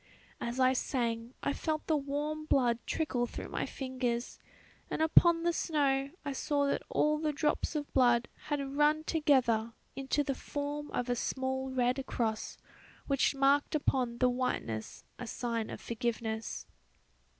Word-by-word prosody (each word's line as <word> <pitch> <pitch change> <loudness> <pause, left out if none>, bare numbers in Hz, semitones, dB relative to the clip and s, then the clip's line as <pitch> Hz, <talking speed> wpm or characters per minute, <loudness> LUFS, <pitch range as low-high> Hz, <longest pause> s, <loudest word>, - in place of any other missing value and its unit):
As 240 +2 -3
I 255 0 +5
sang 235 -2 -1
I 280 - +1
felt 310 +1 -2
the 315 - +2
warm 295 +2 -2
blood 245 -6 +3
trickle 250 -7 0
through - - -7
my - - -2
fingers, 255 -3 -3 0.5
and - - -2
upon 330 +1 +5
the 345 0 +2
snow 280 -5 +1 0.2
I 285 - -2
saw 285 +1 +1
that 280 - 0
all 300 0 +2
the 305 -1 0
drops 300 +2 0
of 295 -1 -3
blood 240 -2 +4 0.2
had 280 -2 -2
run 300 +1 +3
together 255 -8 +2 0.2
into 270 +2 0
the 275 - -1
form 290 +2 -4
of 245 - -2
a 245 - +1
small 265 +2 -2
red 255 +1 +1
cross, 220 -2 -2 0.5
which 275 0 +2
marked 275 +2 +3
upon 255 -5 0
the 255 - +4
whiteness 245 - -2 0.2
a 245 - -5
sign 230 -2 -2
of - - -6
forgiveness. 225 -1 -3
270 Hz, 150 wpm, -32 LUFS, 240-295 Hz, 0.5 s, I